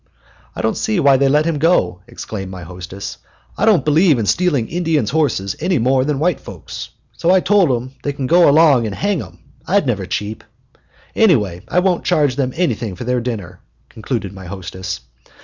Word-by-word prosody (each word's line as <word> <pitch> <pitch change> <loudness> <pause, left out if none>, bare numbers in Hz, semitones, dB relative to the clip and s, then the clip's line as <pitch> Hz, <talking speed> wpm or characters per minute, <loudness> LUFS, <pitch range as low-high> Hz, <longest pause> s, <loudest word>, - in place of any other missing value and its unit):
"I - - -4
don't - - 0
see 215 -4 0
why 140 -3 +5
they 135 0 +3
let 150 +2 +3
him 165 -3 -1
go," 160 - +2
exclaimed 110 -4 -7
my 90 -2 -8
hostess. 90 +3 -8 0.4
"I 210 - 0
don't 200 -11 +4
believe 155 0 +4
in 110 - -1
stealing 145 - +1
Indians' 160 -9 0
horses 140 -11 0
any 180 +1 +1
more 130 +2 +2
than 145 0 -1
white 160 +2 +1
folks'; - - -9 0.2
so 170 - -1
I 190 +1 +6
told 195 -3 +3
'em 125 +1 -2
they 145 - -2
could 140 -2 -4
go 175 +3 +5
along 145 -6 +5
and 100 - -5
hang 200 -3 0
him - - -9 0.3
I'd 195 -1 +2
never 105 -7 -1
cheep. 105 +2 -4 0.7
Anyhow, 110 - +3
I - - -2
won't 180 -2 +1
charge 145 -4 +2
them 130 -2 -1
anything 120 - -1
for 125 - -7
their 125 0 0
dinner," 100 -8 -5 0.3
concluded 110 -3 -4
my 95 -1 -10
hostess. 95 -1 -6
135 Hz, 190 wpm, -18 LUFS, 105-165 Hz, 0.7 s, I